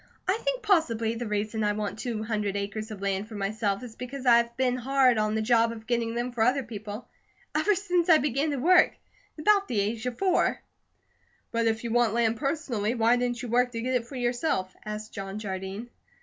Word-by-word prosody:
I 385 +4 +2
think - - -1
possibly 235 - +2
the 230 0 -4
reason 210 +1 -1
I 210 0 +2
want 210 0 -4
two 225 -3 -3
hundred 210 -3 -2
acres 205 +2 -4
of 205 -3 -8
land 195 +1 -1
for 220 - -9
myself 205 +1 -1
is 230 -3 -9
because 255 +2 -7
I've 235 -1 +4
been 255 -1 +2
hard 255 -2 +3
on 215 0 0
the 220 - 0
job 230 0 +3
of 220 -1 -9
getting 235 -1 -1
them 240 +1 -2
for 240 -2 -3
other 255 +4 +3
people 215 -1 -7 0.5
ever 415 - +2
since 360 -2 0
I 320 - +8
began 285 +1 0
to 285 - -1
work, 360 +8 +5 0.4
at - - -7
about 400 +2 +4
the 220 - 0
age 220 +4 -1
of 245 - -4
four." 375 -2 +2 0.9
"But 230 0 +1
if 220 0 0
you 235 - -3
want 235 -2 +2
land 230 -1 +2
personally, 270 -7 -1
why 230 +1 +4
didn't 245 0 -1
you - - -4
work 245 +1 +2
to 230 - -3
get 255 +2 -1
it 240 -2 0
for 275 - -9
yourself?" 240 - -1
asked 215 +1 -6
John 195 -1 -5
Jardine. 195 +3 -5
235 Hz, 215 wpm, -27 LUFS, 215-255 Hz, 0.9 s, I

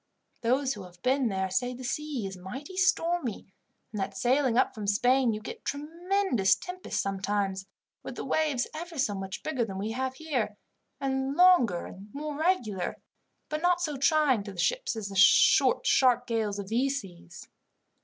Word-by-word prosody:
Those 260 +3 +1
who 205 - -9
have 180 -1 -13
been 260 0 +2
there 190 -2 -2
say 245 +7 -1
the 255 - -9
sea 275 -2 -3
is 190 -1 -5
mighty 250 - -8
stormy, 345 - 0 0.4
and 210 -2 -4
that, 195 0 -4
sailing 250 +2 +2
up 260 - +3
from 210 -2 -6
Spain, 245 +4 +3
you 215 - -3
get 215 - -9
tremendous 325 - +1
tempests 365 0 -5
sometimes, 195 0 -2 0.3
with - - -8
the - - -5
waves 300 -6 +1
ever 330 +1 -7
so 255 -6 +1
much 195 -1 -6
bigger 275 -6 -1
than 195 -4 -5
we 210 +3 -3
have 260 +2 -3
here, 260 -9 -2 0.4
and 265 0 -1
longer 320 - +5
and 195 +2 -11
more 300 0 -4
regular, 285 - 0 0.5
but 305 0 -3
not 355 0 +3
so 310 -4 -2
trying 280 -4 +3
to 200 0 -8
the - - -14
ships - - 0
as 215 -3 -5
the 195 - -8
short 195 - +5
sharp 245 -2 +4
gales 220 -4 -1
of 200 -1 -6
these 270 +5 +1
seas." 175 - -13
250 Hz, 175 wpm, -28 LUFS, 200-300 Hz, 0.5 s, longer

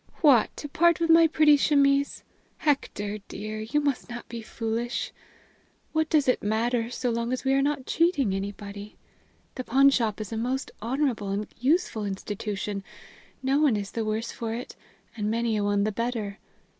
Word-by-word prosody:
"What! 275 -9 +6
to 295 - -5
part 340 +3 +3
with 335 -1 +2
my 330 0 +7
pretty 305 -1 +5
chemise. 280 -1 +2 0.3
Hector, 210 -8 -1
dear, 215 +2 -6
you 230 +7 0
must 285 -4 -1
not 240 0 -7
be 235 -1 -6
foolish! 230 +2 -3 0.8
What 315 0 +1
does 300 -4 +3
it 255 - +2
matter, 230 +2 0
so 245 0 -2
long 235 +1 -1
as 255 - -2
we 265 0 +2
are 275 - +3
not 280 -2 -1
cheating 300 - +2
anybody? 200 +1 -6 0.6
The 255 - -5
pawnshop 255 -5 +3
is 215 0 -6
a - - -2
most 255 +4 -2
honorable 240 -3 -1
and 200 +2 -1
useful 270 - +1
institution. 200 0 -4 0.6
No 270 +2 +2
one 275 -8 +4
is 200 -1 -5
the 225 - -2
worse 220 +2 -2
for 225 -1 -4
it, 245 - -7 0.4
and 210 -2 -2
many 230 0 0
a 210 - 0
one 205 0 +2
the 215 - 0
better. 220 -2 -3
235 Hz, 170 wpm, -26 LUFS, 215-275 Hz, 0.8 s, my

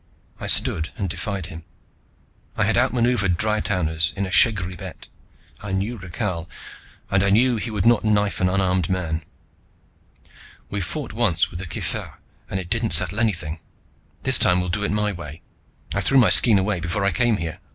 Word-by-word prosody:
I - - -5
stood 80 0 +1
and 100 - -2
defied 100 +1 -4
him. 85 -2 -9 0.9
I 110 - +2
had 110 +2 +1
outmaneuvered 120 -7 +2
Dry 110 +2 +2
towners 80 -6 0
in 100 - -1
a 95 - -6
shegri 95 -6 +3
bet. - - -9 0.5
I 105 -2 -5
knew 100 +5 -1
Rakhal, 90 -3 -4 0.6
and 95 - +3
I 100 - +2
knew 120 +4 +3
he 110 - -3
would 105 -2 -2
not 120 -1 +4
knife 105 -2 +1
an 90 - +3
unarmed 95 -2 +1
man. 85 -4 -2 1.5
"We 100 - -2
fought 130 - -5
once 105 -7 +1
with 85 - -7
the 95 - -6
kifirgh - - -5 0.3
and 95 - -2
it 90 -2 -8
didn't 115 -1 +1
settle 105 - +2
anything. 85 -8 -1 0.6
This - - +5
time 90 - +4
we'll 90 0 -2
do 105 +3 -1
it - - 0
my 105 0 +1
way. 80 -4 -9 0.5
I - - 0
threw 135 - +2
my 125 - +5
skean 110 -4 +5
away 95 -1 0
before 85 +4 -2
I 100 - +3
came 120 +1 +1
here. 85 -3 -5
100 Hz, 185 wpm, -22 LUFS, 90-110 Hz, 1.5 s, This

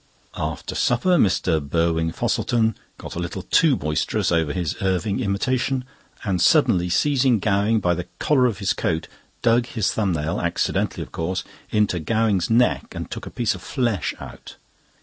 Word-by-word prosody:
After - - -4
supper, 185 -2 +2
Mr. 90 - +2
Burwin 80 +2 0
Fosselton 110 +4 0 0.2
got - - -8
a - - -4
little 90 +2 -4
too 145 - +4
boisterous 75 -3 -1
over 80 -3 +1
his 85 -2 -2
Irving 95 +3 0
imitation, 125 +4 0 0.4
and 95 -6 0
suddenly 90 0 +4
seizing 130 +3 +3
Gowing 105 +2 +2
by 90 -3 +1
the 90 0 -4
collar 130 -4 +3
of 110 -6 -2
his 100 -1 0
coat, 80 -1 -2 0.4
dug 120 +1 +3
his 110 -6 0
thumb 100 -5 0
nail, 75 0 -2
accidentally - - -1
of - - -13
course, 90 +3 -2 0.3
into 105 -4 +1
Gowing's 105 0 +1
neck 120 +2 +2
and - - -6
took - - -6
a - - -5
piece 120 -3 0
of - - -9
flesh 120 - -1
out. - - -10
100 Hz, 165 wpm, -23 LUFS, 85-115 Hz, 0.4 s, too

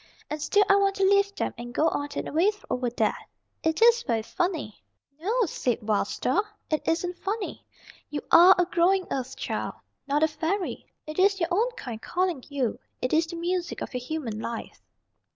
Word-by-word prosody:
And 300 0 -3
still 410 +7 +4
I 395 - +6
want 395 -1 +2
to 390 - 0
leave 400 +1 +4
them, - - -2
and 240 +1 -8
go 315 - +3
on 285 - -2
and - - -3
away 335 +7 +3 0.2
over 250 -1 0
there. 225 -2 +1 0.5
It 320 +7 +2
is 470 0 +6
very 225 - -1
funny." 325 - -2 0.4
"No," 445 +8 +1
said 245 - -2
Wild 210 -2 +2
Star. 420 - 0 0.3
"It 310 - +1
isn't 350 +2 0
funny. 410 +1 -3 0.5
You 295 - -3
are 350 +3 +9
a 360 - +3
growing 365 +2 +2
Earth 265 0 -3
Child, - - -3 0.3
not 290 +2 +2
a - - +6
fairy. 340 +5 -3 0.2
It 305 +3 -5
is 390 +1 +4
your 335 -1 0
own 440 +7 +2
kind 240 - -7
calling 355 -7 -1
you. 270 -6 -1 0.2
It 255 - -2
is 320 +1 +3
the 340 - -6
music 345 +1 -2
of - - -5
your 250 - -2
human 250 -5 -4
life." 230 +1 -6
330 Hz, 190 wpm, -27 LUFS, 265-385 Hz, 0.5 s, are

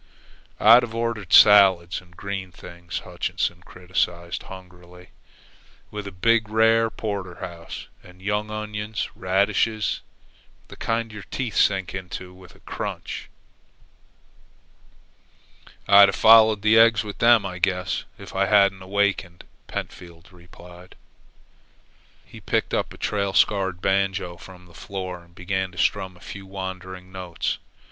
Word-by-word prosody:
"I'd 115 +3 +8
have 115 -2 -6
ordered 115 -5 -3
salads 95 -5 +6
and 85 -2 -22
green 100 -2 -5
things," 85 0 -8
Hutchinson 85 0 -3
criticized 90 -1 -3
hungrily, 90 -1 -13 0.8
"with 105 -1 -6
a - - -6
big, 110 +4 +1
rare, 115 +1 +3
Porterhouse, 90 -6 -6 0.2
and 90 0 -16
young 105 +2 -2
onions 105 0 -4
and - - -23
radishes, 100 +3 0 0.7
the - - -11
kind 115 0 -2
your 105 -1 -9
teeth 120 +2 -5
sink 95 -4 +2
into 90 -1 -7
with 90 -2 -16
a - - -22
crunch." - - -6 2.6
"I'd 100 0 +8
have 95 - -3
followed 110 -2 +6
the 110 +1 +5
eggs 115 -1 +5
with 105 -1 -8
them, 115 -3 +5
I 90 -2 -6
guess, 90 -1 -1
if - - -11
I 95 0 +2
hadn't 100 -2 +3
awakened," 95 -2 -1 0.2
Pentfield 85 +3 -8
replied. 90 0 -15 1.3
He - - -13
picked - - -1
up - - -1
a - - -12
trail 100 -2 -2
scarred 95 -3 +2
banjo 95 -2 0
from 90 0 -14
the 85 - -19
floor 90 0 -7
and 85 0 -25
began 95 +1 -3
to - - -15
strum 95 -2 -1
a - - -21
few 100 0 -9
wandering 95 -1 -7
notes. 90 -2 -4
95 Hz, 135 wpm, -23 LUFS, 90-105 Hz, 2.6 s, I'd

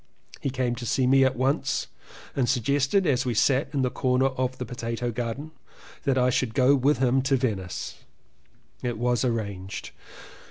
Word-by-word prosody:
He 140 - -2
came 130 -2 -1
to 120 - -6
see 130 +4 +2
me 135 +1 +5
at 130 0 +2
once 130 +3 0 0.5
and 125 -4 +1
suggested 140 - +2
as 135 -4 +2
we 125 -3 -2
sat 135 +4 +2
in 140 -3 0
the 125 - 0
corner 130 +1 +2
of 130 -1 -2
the 125 - -4
potato 115 0 -3
garden, 120 +7 -4 0.5
that 135 -2 +2
I 125 0 +3
should 115 -3 -1
go 130 +1 +5
with 140 +3 +2
him 130 0 +2
to 135 0 +2
Venice. 100 -9 -3 0.8
It 120 -2 -2
was 120 +1 +1
arranged. 100 -6 -3
125 Hz, 170 wpm, -26 LUFS, 120-135 Hz, 0.8 s, me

